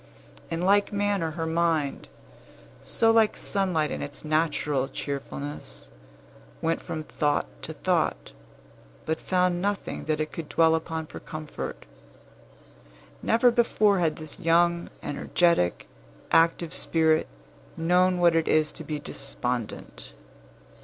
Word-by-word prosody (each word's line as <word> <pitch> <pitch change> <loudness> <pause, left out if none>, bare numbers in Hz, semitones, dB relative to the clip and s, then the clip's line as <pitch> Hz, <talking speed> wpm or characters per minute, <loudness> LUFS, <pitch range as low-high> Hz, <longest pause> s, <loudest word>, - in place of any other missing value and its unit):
In 165 0 -2
like 200 +2 +3
manner 205 -4 0
her 165 0 -3
mind, 160 -3 0 0.7
so 225 0 +2
like 225 -1 +3
sunlight 180 -6 0
in - - -4
its 145 +2 -5
natural 150 -3 +1
cheerfulness, 140 +1 -6 0.7
went 165 0 0
from 155 - -5
thought 150 -1 0 0.2
to - - -5
thought, - - 0 0.7
but 160 0 -2
found 180 -1 +1
nothing 205 +1 -2
that 155 -1 0
it 155 0 -2
could 160 -3 -7
dwell 160 -1 +4
upon 160 0 -2
for - - -9
comfort. 155 -1 -7 1.4
Never 235 +2 +4
before 215 -4 +3
had 160 -3 +1
this 155 +1 -8
young, 170 0 +2
energetic, 145 - +1 0.5
active 165 0 +3
spirit 160 -1 +2 0.5
known 180 +2 +3
what 175 -2 +4
it 165 -1 +2
is 155 -1 +3
to 160 - -8
be 150 0 -3
despondent. 125 -5 -4
165 Hz, 120 wpm, -26 LUFS, 155-180 Hz, 1.4 s, dwell